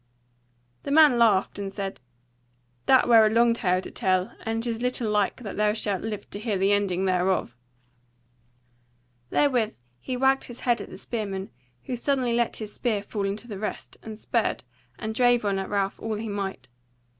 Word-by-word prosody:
The - - -6
man 290 -4 +6
laughed, 205 -3 +3
and 195 -1 -4
said: 195 -1 -5 0.9
"That 260 - +5
were 230 -2 +7
a 215 - +4
long 230 +1 +4
tale 185 -5 +1
to - - -9
tell; 185 0 0
and 225 +1 -2
it - - -3
is 230 0 -2
little 250 -3 -1
like 210 +4 0
that 205 - -6
thou 210 0 +3
shalt 205 -3 -1
live 215 -2 -5
to 205 - -5
hear 215 -2 -1
the 195 +2 +2
ending 195 -2 +1
thereof." 185 -9 +1 1.7
Therewith 245 -7 +2 0.2
he 250 - -4
wagged 270 +1 +3
his 240 - -10
head 240 -3 +1
at - - -8
the - - -10
spearman, 200 -4 -4 0.3
who 250 - -3
suddenly 255 -1 0
let 235 0 +1
his 215 -2 -6
spear 215 -5 -1
fall 205 -1 -3
into 210 +4 -3
the 205 -4 -6
rest, 215 - -5
and 220 -1 -8
spurred, - - -1 0.3
and 220 0 -4
drave 245 -1 +3
on 195 -1 +1
at 190 - -4
Ralph 200 -1 -1
all 225 -1 -3
he 220 +1 -4
might. 195 -10 -4
215 Hz, 185 wpm, -26 LUFS, 195-235 Hz, 1.7 s, were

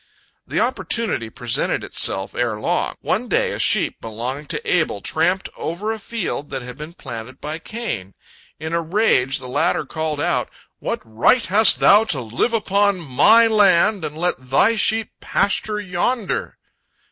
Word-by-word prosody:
The - - -2
opportunity 220 - -1
presented 120 0 -1
itself 95 0 +1
ere 115 -3 -2
long. - - -1
One - - -1
day - - +1
a - - -5
sheep - - +1
belonging 125 +6 -5
to - - -3
Abel 160 - 0
tramped 180 - 0
over 195 +7 -4
a 225 - -5
field 200 -9 -4
that 135 -2 -5
had 125 0 -8
been 155 +2 -9
planted 125 -2 -9
by 155 +2 -5
Cain. 165 - -6 0.4
In 160 +2 -5
a 170 - +1
rage, 165 - +2
the 130 - -8
latter 155 +4 0
called 155 0 -3
out, - - 0 0.3
"What - - -3
right 115 - +2
hast 210 +5 +5
thou 210 +2 +6
to 160 -11 +1
live 120 - -1
upon 200 -2 +1
my 190 - +5
land 205 -3 +3
and 150 0 -5
let 175 +2 0
thy 200 - +3
sheep 220 0 +2
pasture 210 +1 0
yonder?" 200 +4 -2
165 Hz, 160 wpm, -20 LUFS, 130-210 Hz, 0.4 s, thou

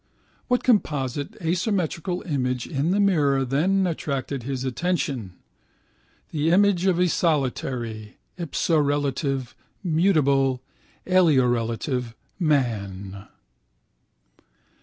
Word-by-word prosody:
What 250 -1 +1
composite 145 - 0
asymmetrical 180 0 -1
image 125 -6 -1
in 145 +2 -1
the 195 +3 +2
mirror 145 -9 +3
then 180 +9 +2
attracted 140 -5 -3
his 130 +1 -4
attention? 130 - -2 1.0
The 155 +1 0
image 195 0 +3
of 185 -3 +3
a 180 0 +3
solitary 125 -9 -1 0.2
(ipsorelative) 145 -5 0 0.3
mutable 140 -7 +2 0.4
(aliorelative) 125 -7 +1 0.2
man. 100 - -1
145 Hz, 80 wpm, -24 LUFS, 125-175 Hz, 1.0 s, mirror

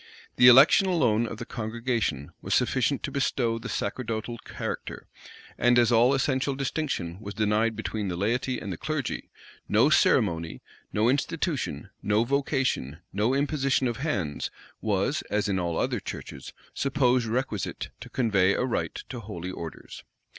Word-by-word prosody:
The 125 - +8
election 135 +10 +8
alone 120 - +2
of 110 - -6
the 120 - -6
congregation 110 - -2
was - - 0
sufficient 135 +1 +1
to 140 - -3
bestow 120 -4 0
the - - -7
sacerdotal 115 +1 -3
character; - - -6 0.5
and 120 +1 +4
as 120 -1 +4
all 120 +4 +5
essential 135 +1 0
distinction 135 - -3
was 100 -2 -7
denied 110 +2 +1
between 105 -2 -3
the 90 - -2
laity 120 +7 0
and 100 - -5
the - - -7
clergy, 155 -4 -3 0.4
no - - +4
ceremony, 85 -5 +2 0.3
no 105 +2 +2
institution, 145 +3 -1
no 105 +2 +2
vocation, 130 - 0 0.2
no 110 +7 +1
imposition 140 -2 +1
of 120 - -2
hands 100 - -2 0.3
was, - - 0
as 105 +1 0
in 95 -2 0
all 85 -2 -1
other - - 0
churches, - - -8 0.2
supposed 130 -3 +2
requisite 115 -3 -2
to - - -10
convey 100 -6 +2
a - - 0
right 125 - -2
to 125 - -5
holy 95 -4 -6
orders. 85 -3 -8
115 Hz, 150 wpm, -27 LUFS, 105-135 Hz, 0.5 s, The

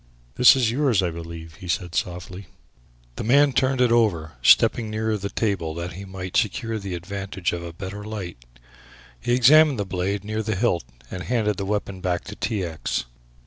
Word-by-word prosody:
"This 125 - +7
is 120 -4 +2
yours, 125 -7 +2
I 90 - 0
believe," 80 -1 -9
he 90 - -10
said 90 -1 -2
softly. 90 +2 -4 0.7
The - - -3
man 140 +4 +4
turned 130 +1 +1
it 125 -2 +4
over, 95 -10 +2
stepping 110 - +5
nearer 110 0 -1
the 100 -1 -4
table 95 -9 -1
that 85 +1 -5
he 100 +3 -8
might 95 -1 -7
secure 115 0 0
the 100 -3 -5
advantage 95 0 -4
of 85 - -3
a 85 0 -7
better 95 +4 -7
light. 95 - -7 0.8
He 120 - +1
examined 145 +3 +6
the 100 - -2
blade 95 +2 -2
near 110 +1 -3
the 110 -1 -2
hilt 95 -5 0 0.3
and 90 - -5
handed 105 -2 0
the 100 - -3
weapon 100 -2 -3
back 90 -2 -1
to 105 - -9
T. 105 -4 -2
X. 80 -7 -3
100 Hz, 185 wpm, -24 LUFS, 90-110 Hz, 0.8 s, This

